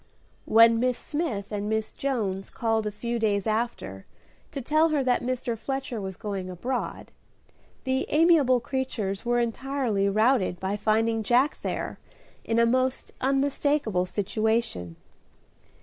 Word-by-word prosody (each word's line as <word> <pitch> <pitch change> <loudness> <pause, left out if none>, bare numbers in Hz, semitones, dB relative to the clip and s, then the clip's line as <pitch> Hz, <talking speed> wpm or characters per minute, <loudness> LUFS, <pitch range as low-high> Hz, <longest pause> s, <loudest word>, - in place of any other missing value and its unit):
When 230 +1 +6
Miss 250 0 +1
Smith 270 - -3
and 205 0 -2
Miss 220 0 -1
Jones 205 -8 -2
called 225 -2 0
a - - -2
few 235 +3 -3
days 205 -3 +1
after 215 - -2 0.4
to - - -4
tell 310 +5 +3
her 295 -3 +1
that 250 -1 +2
Mr. 250 -1 -2
Fletcher 260 -1 -4
was 190 -1 -6
going 195 -3 -4
abroad, 240 +9 -4 0.7
the 260 0 0
amiable 300 -6 +4
creatures 235 -6 -3
were 240 0 +2
entirely 235 -4 0
routed 215 -3 +2
by 190 +2 -2
finding 225 +2 +1
Jack 250 +6 +2
there - - -4 0.4
in 225 - -1
a 235 - +5
most 255 +2 0
unmistakable 275 -7 +1
situation. 205 - -1
230 Hz, 135 wpm, -26 LUFS, 205-260 Hz, 0.7 s, When